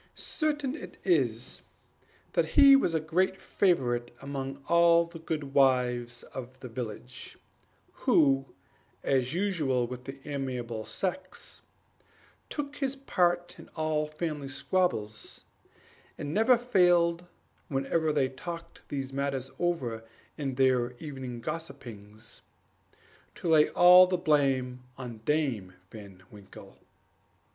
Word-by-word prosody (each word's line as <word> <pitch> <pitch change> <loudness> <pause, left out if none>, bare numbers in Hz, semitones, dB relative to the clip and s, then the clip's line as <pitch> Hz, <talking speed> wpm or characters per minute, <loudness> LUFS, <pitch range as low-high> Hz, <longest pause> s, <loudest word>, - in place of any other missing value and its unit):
Certain 295 -4 -1
it 315 - -9
is, 360 - +1 0.7
that - - 0
he 280 -1 +10
was 175 -11 +2
a - - +3
great 180 +5 0
favorite 120 -11 +1
among 135 0 -5
all 170 0 +5
the 170 0 -11
good 150 -4 -4
wives 125 -3 +2
of 130 0 -8
the 130 - -8
village, 120 +1 -7 0.6
who, 135 -2 +3 0.6
as 130 +2 +1
usual 155 -11 +1
with 125 +1 -8
the 135 +1 -7
amiable 125 -6 -4
sex, 195 +9 -4 0.9
took 295 -1 -5
his 275 -1 -1
part 175 -9 0
in - - -13
all 155 -1 0
family 150 -2 -4
squabbles; 135 - -2 0.7
and 145 +1 -4
never 225 +4 +5
failed, 175 -7 +3 0.4
whenever 150 +3 0
they 145 -3 +2
talked 170 +5 -8
those 135 -1 -4
matters 135 -1 -2
over 130 -11 -1 0.3
in 135 -3 -3
their 125 -2 +2
evening 130 -3 -7
gossipings, 115 -9 -7 0.9
to - - -5
lay 155 -2 +5
all 180 +1 +8
the 180 0 0
blame 135 -6 +1 0.2
on 120 -4 -7
Dame 130 -12 0 0.2
Van 100 -4 -12
Winkle. 100 -2 -14
140 Hz, 115 wpm, -29 LUFS, 125-175 Hz, 0.9 s, he